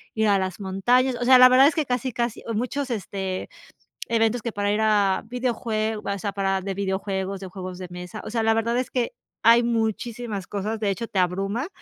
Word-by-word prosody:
ir 220 -1 +2
a 200 -1 +4
las 185 +1 -3
montañas, 245 +7 +2
o 245 - -3
sea, 255 0 +7
la 255 - +10
verdad 260 +2 +7
es 305 - +1
que 310 -3 0
casi 250 +1 -1
casi 235 -2 -2
o 230 - -2
muchos, 255 +5 -2
este, 190 -3 -4 0.6
eventos 225 0 +2
que 235 - -2
para 205 0 0
ir 215 +1 +1
a 205 -3 +2
videojuegos 225 -3 -2
o 200 - -5
sea, 200 +1 -2
para 195 -1 0
de 195 +1 -3
videojuegos 195 0 -2
de 190 - -6
juegos 185 -1 -7
de 180 - -6
mesa, 180 +4 -8
o 215 - -5
sea, 230 -1 0
la 225 0 +4
verdad 230 +2 0
es 255 0 -2
que 245 -2 -1 0.3
hay 235 +2 +6
muchísimas 225 -2 -2
cosas. 210 +2 -3
De 205 - +1
hecho, 200 +4 -3
te 195 - -6
abruma 195 - 0
215 Hz, 220 wpm, -24 LUFS, 195-240 Hz, 0.6 s, la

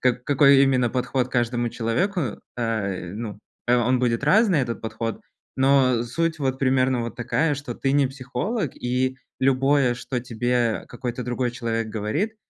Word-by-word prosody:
как 125 -1 +1
какой 140 -1 +5
именно 130 -3 +3
подход 125 0 -1
к - - -22
каждому 120 -1 0
человеку, 120 - -1 0.2
э, 100 -6 -2
ну, 105 -2 -6 0.3
а, 125 - +5
он 130 0 +3
будет 120 0 0
разный, 195 -2 +4
этот 120 -2 -3
подход. 115 0 -4 0.4
Но 130 -3 +4
суть 160 +7 -1
вот 130 -2 -1
примерно 130 -1 +2
вот 115 - -6
такая, 150 +5 0
что 135 -4 -6
ты 135 - -1
не 140 -1 +4
психолог, 140 - -3
и 130 +1 -1 0.2
любое, 135 -1 +3
что 125 +1 -4
тебе 120 -1 -1
какой-то 125 -1 -5
другой 125 0 -1
человек 115 -2 -2
говорит, 110 - -2
125 Hz, 160 wpm, -24 LUFS, 120-135 Hz, 0.4 s, какой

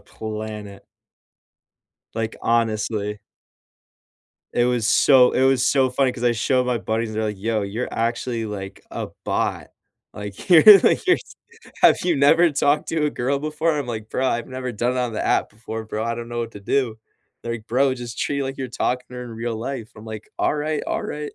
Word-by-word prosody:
planet. 105 -2 -7 1.3
Like, 115 -1 -2
honestly. 110 -2 0 1.4
It 120 - +3
was 120 -3 +1
so 125 0 +6
it - - +1
was 130 -1 +3
so 130 -1 +3
funny 130 +1 +1
'cause 125 -1 -8
I 120 - +4
show 125 +3 +1
my 125 -1 0
buddies, 110 0 -2
they're 110 +1 -1
like, 105 -2 -3
"Yo, 110 0 -1
you're 105 +5 -3
actually 115 0 -2
like 100 -2 -7
a - - -4 0.2
bot. - - -2 0.4
Like, 105 -1 -8
you're, 175 -4 +8 0.2
like, - - +2
you're 370 - +6
s - - -13 0.5
have - - +7
you 175 -2 +2
never 160 +5 +5
talked 145 +1 +1
to 160 -2 0
a - - +2
girl 140 +1 -1
before?" 155 +2 0
I'm 145 -3 -3
like, 110 -2 -5
"Bro, 130 - 0
I've 120 -2 -1
never 130 -1 -5
done 120 +2 -1
it 125 - -1
on 125 -1 -1
the 110 - -2
app - - +1
before, 110 +1 -7
bro. 110 0 -3
I 115 0 -1
don't 120 0 -7
know 120 - -5
what 115 -1 -4
to 100 - -10
do." 115 +1 -1 0.4
Like, 115 -2 -5
"Bro, 130 +3 +2
just 120 -2 -7
treat 140 -1 -1
like 135 0 -5
you're 130 - -3
talking 125 +1 -2
to 125 - -10
her 125 - -5
in 120 - -9
real 115 +1 -3
life." 120 -1 -5
I'm 110 0 -12
like, 110 -1 -8
"Alright, 150 0 0
alright." 150 0 -4
120 Hz, 195 wpm, -22 LUFS, 110-135 Hz, 1.4 s, you're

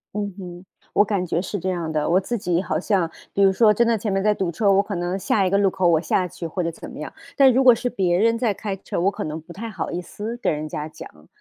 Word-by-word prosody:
嗯 205 -2 -3
哼， 180 -1 -9 0.3
我 205 - +4
感 195 -3 -1
觉 170 0 -1
是 200 +2 -4
这 190 0 -3
样 170 -3 -2
的。 155 -1 -1
我 180 - +4
自 235 +5 -3
己 180 -2 0
好 155 -4 -2
像 180 -2 0 0.2
比 200 - 0
如 195 -1 +5
说 215 +1 +5
真 235 +3 +2
的 230 - +2
前 210 -1 -3
面 195 0 +1
在 210 +1 +3
堵 185 -4 -2
车， 200 +4 +1
我 195 +1 +4
可 200 - -5
能 175 +2 -2
下 195 +1 +1
一 - - +1
个 200 - +2
路 200 -1 +3
口 185 -1 +1
我 160 -2 +4
下 180 +2 0
去 170 - -8
或 175 +3 -3
者 170 - -1
怎 165 - -9
么 - - -9
样， - - -6 0.3
但 270 -2 +7
如 265 - +3
果 250 -2 +8
是 245 +2 -2
别 185 -7 +1
人 230 +4 +3
在 230 -4 +1
开 200 0 -4
车， 190 - -5
我 190 +3 +3
可 - - -5
能 155 +1 -4
不 165 +2 -13
太 225 +6 -6
好 215 - -4
意 175 - -3
思 210 +6 -6
跟 - - 0
人 150 +1 -4
家 150 0 -5
讲。 75 - -13
190 Hz, 320 characters per minute, -22 LUFS, 170-210 Hz, 0.3 s, 果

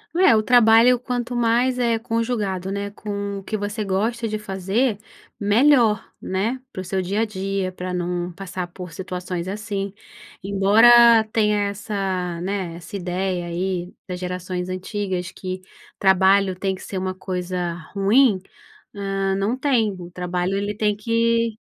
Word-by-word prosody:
Não 360 - +2
é, 235 - +7
o 215 - +2
trabalho, 235 +1 +6
quanto 245 -1 -3
mais 240 +2 +2
é 235 -2 +2
conjugado, 225 -5 -2
né, 200 0 -3
com 200 -1 -4
o - - -12
que 215 +2 -3
você 205 +1 -3
gosta 220 +5 -1
de 215 0 -2
fazer, 205 +3 -1 0.4
melhor, 225 +1 +4
né, 220 +7 -2
para 185 - -5
o - - -6
seu 190 +1 -1
dia 200 +4 -1
a - - +2
dia, 195 -2 -3
para 180 0 -5
não 175 0 -2
passar 185 0 -6
por 175 -1 -9
situações 180 0 -5
assim. 200 0 -3 0.5
Embora 225 +4 +6
tenha 210 -2 +2
essa, 190 -4 -3
né, 185 -2 -3
essa 175 +5 -9
ideia 180 -1 -2
aí, 180 +1 -2 0.2
das 180 -1 -5
gerações 180 0 -4
antigas, 185 -1 -3
que 185 0 -6 0.3
trabalho 190 0 +4
tem 190 +1 -2
que 190 - -13
ser 190 - -4
uma 185 0 -3
coisa 180 -2 -3 0.2
ruim, 205 +2 +4 0.5
hã, 195 -1 -1
não 200 +6 0
tem. 245 -7 +1
O 175 0 -9
trabalho, 180 +1 -2
ele 205 +1 -2
tem 210 -1 +1
que 230 +1 +1
195 Hz, 155 wpm, -22 LUFS, 185-225 Hz, 0.5 s, é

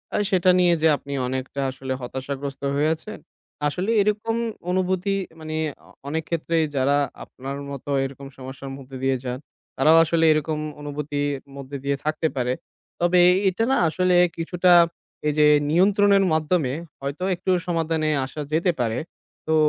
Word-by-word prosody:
আ - - +2
সেটা 185 -1 +3
নিয়ে 175 -1 +4
যে 160 - +5
আপনি 140 0 -8
অনেকটা 130 +2 -3
আসলে 130 0 -5
হতাশাগ্রস্ত 135 +2 -5
হয়ে 150 +2 +2
আছেন। 215 +7 -10 0.5
আসলে 185 +9 -1
এরকম 210 +2 0 0.4
অনুভূতি 185 +1 0 0.2
মানে 155 0 -5 0.3
অ - - -19 0.2
অনেক 160 +2 -2
ক্ষেত্রেই 165 -1 +1
যারা 140 +2 +3 0.3
আপনার 135 +2 -7
মতো 140 +1 -7
এরকম 135 +1 -6
সমস্যার 135 +1 -8
মধ্য 135 -1 -13
দিয়ে 135 -1 +2
যান 125 0 -3 0.4
তারাও 155 +5 +6
আসলে 165 0 +2
এরকম 155 0 0 0.2
অনুভূতির 145 0 -4 0.4
মধ্য 140 0 -9
দিয়ে 140 0 0
থাকতে 155 +1 0
পারে। 125 -1 0 0.5
তবে 175 +1 +3
এ - - +7 0.2
এটা 205 +5 -1
না - - +3
আসলে 185 +1 +2 0.2
কিছুটা 180 +2 +2 0.6
এই 150 - +2
যে 150 - +6 0.2
নিয়ন্ত্রণের 200 +3 +4
মাধ্যমে 155 -4 +1 0.3
হয়তো 140 +6 -4
একটু 185 +2 -2 0.2
সমাধানে 165 -2 0 0.2
আসা 150 +3 -7
যেতে 175 +3 +3
পারে। 115 0 0 0.5
তো 160 - +4
155 Hz, 150 wpm, -23 LUFS, 140-180 Hz, 0.6 s, এ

